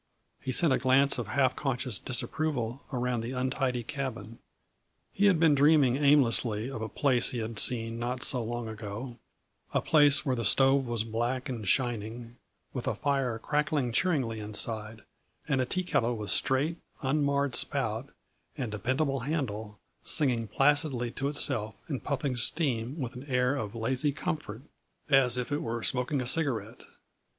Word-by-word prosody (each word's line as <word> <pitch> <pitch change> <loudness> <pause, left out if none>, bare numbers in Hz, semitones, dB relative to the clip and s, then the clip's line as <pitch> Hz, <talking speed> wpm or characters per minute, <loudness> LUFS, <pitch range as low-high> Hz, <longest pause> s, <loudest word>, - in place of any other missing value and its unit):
He 130 - -3
sent 150 +2 +4
a - - +1
glance 135 +1 +4
of 120 - -4
half 130 +3 +1
conscious 130 -6 -2
disapproval 130 -2 -2
around 125 -2 -1
the 120 +3 -5
untidy 130 -1 -1
cabin. 120 -5 -6 0.7
He 205 +1 +3
had 185 -5 +3
been 160 -2 +5
dreaming 145 -3 +4
aimlessly 130 -5 +3
of 115 - -6
a 110 - -4
place 130 -4 +2
he 125 - -4
had 110 -1 -3
seen 115 -2 0
not 125 +2 -3
so 125 -3 +1
long 120 0 -4
ago; 110 +3 -7 0.6
a - - +4
place 145 -1 +5
where 130 -3 +1
the 115 - -3
stove 135 +5 +4
was 120 -2 0
black 120 +4 -2
and 115 -6 -5
shining, 115 +1 -1 0.4
with - - -5
a - - 0
fire 135 -5 -1
crackling 150 0 -1
cheeringly 125 -6 0
inside 110 +1 -3 0.4
and 135 -3 +1
a 130 - -1
teakettle 140 -10 0
with 105 -3 +1
straight, 145 +6 +2 0.3
unmarred 140 0 +1
spout - - -1 0.5
and 125 -5 -3
dependable 130 +7 -1
handle 115 -7 -4 0.2
singing 125 -7 +1
placidly 135 -2 +2
to 135 - -3
itself 130 -7 -2
and 140 -5 -4
puffing 140 -2 -2
steam 125 0 +1
with 125 -3 -4
an 130 +2 -9
air 125 -1 +1
of 110 -5 -5
lazy 130 +6 -1
comfort, 150 - -5 0.5
as 130 -3 +5
if 125 +3 -3
it 145 - -1
were 115 0 -4
smoking 125 +3 0
a - - -4
cigarette. 125 -6 0
125 Hz, 160 wpm, -29 LUFS, 115-140 Hz, 0.7 s, been